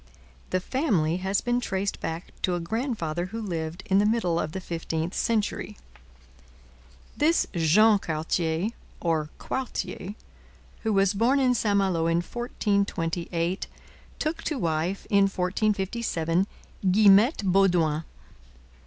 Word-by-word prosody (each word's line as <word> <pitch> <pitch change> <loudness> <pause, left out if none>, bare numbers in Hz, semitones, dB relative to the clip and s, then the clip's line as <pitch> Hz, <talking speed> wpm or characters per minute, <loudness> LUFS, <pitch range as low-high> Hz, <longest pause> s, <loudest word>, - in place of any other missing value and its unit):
The 185 - +1
family 185 - 0
has 190 +2 0
been 245 0 0
traced 195 -2 -2
back 165 +1 -5
to 180 - +1
a - - -2
grandfather 175 - -2
who 225 +4 -6
lived 170 -3 -4
in 195 +1 +3
the 205 - +3
middle 185 -7 +1
of 155 - -2
the 190 - -4
fifteenth 165 -1 -3
century. 215 -2 -1 1.4
This 320 +3 +3
Jean 200 +6 +5
Cartier, 160 +3 -1 0.3
or 160 -3 0
Quartier, 235 -6 -4 0.7
who 220 - 0
was 195 -1 +3
born 235 +7 +3
in 255 -2 +3
St 215 -4 +1
Malo 180 -4 +1
in 165 0 +2
1428, 175 -5 -1 0.5
took 310 +1 -2
to 305 - -2
wife 170 0 -1
in 200 -1 +5
1457 190 -2 0 0.4
Guillemette 210 - +5
Baudoin. 175 -5 +3
190 Hz, 120 wpm, -26 LUFS, 165-215 Hz, 1.4 s, Jean